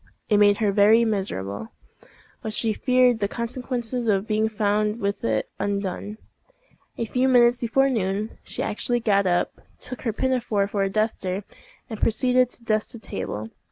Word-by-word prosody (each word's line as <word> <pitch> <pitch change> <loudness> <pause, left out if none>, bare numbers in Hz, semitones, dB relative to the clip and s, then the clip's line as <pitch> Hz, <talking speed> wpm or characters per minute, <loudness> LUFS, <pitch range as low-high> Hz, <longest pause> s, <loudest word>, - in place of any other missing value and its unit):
It 210 - +4
made 205 0 +5
her 210 -3 +1
very 215 +3 +5
miserable, 110 - -2 0.7
but 220 - -3
she 225 -1 +1
feared 250 -1 +3
the 200 - 0
consequences 240 +1 -3
of 200 -2 +2
being 220 0 +1
found 210 +1 0
with 200 -1 -2
it 110 -1 0
undone. 200 +1 -3 0.8
A 230 - -1
few 250 +4 +1
minutes 245 -1 +5
before 270 +3 +2
noon, 210 -3 -2
she - - -3
actually 240 +3 -1
got 200 -4 +2
up, 175 -1 +1 0.3
took 255 - -7
her 235 - -1
pinafore 230 -4 0
for 200 0 -2
a 195 - +1
duster, 200 -2 -1 0.4
and 220 -4 -7
proceeded 250 +2 +3
to 240 - -7
dust 215 +1 0
the - - -7
table. 110 - -5
215 Hz, 160 wpm, -24 LUFS, 200-240 Hz, 0.8 s, made